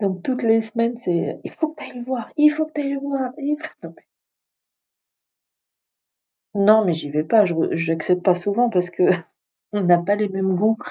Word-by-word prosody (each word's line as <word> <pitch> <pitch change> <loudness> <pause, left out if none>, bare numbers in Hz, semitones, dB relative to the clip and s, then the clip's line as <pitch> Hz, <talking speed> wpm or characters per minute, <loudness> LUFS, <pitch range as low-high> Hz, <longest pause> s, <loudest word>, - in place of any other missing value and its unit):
Donc 190 -3 -2
toutes 255 -1 -2
les 225 0 +4
semaines: 230 +2 -2
«C'est 180 -8 -2
il - - -7
faut 315 - -2
que 310 -1 -12
tu - - -7
ailles 250 - -11
le 240 - -7
voir 250 -3 -4
il 300 0 +6
faut 315 +1 -1
que 310 - -19
tu - - -1
ailles 275 0 -3
le 275 - -3
voir, 275 -2 -3
il 295 +1 -1
faut» 315 - -11 2.7
Non 215 +2 +5
mais 180 -4 +1
j'y 155 -2 -6
vais 150 +1 -1
pas, 210 +5 +4
je 170 - -1 0.2
j'accepte 165 +2 -1
pas 185 - +4
souvent 205 +7 0
parce 180 -4 0
qu'on 180 -1 +1 0.6
a 175 - +7
pas 185 +4 0
les 210 -1 -1
mêmes 190 -1 -1
goûts. 215 +4 +2
215 Hz, 205 wpm, -21 LUFS, 180-255 Hz, 2.7 s, a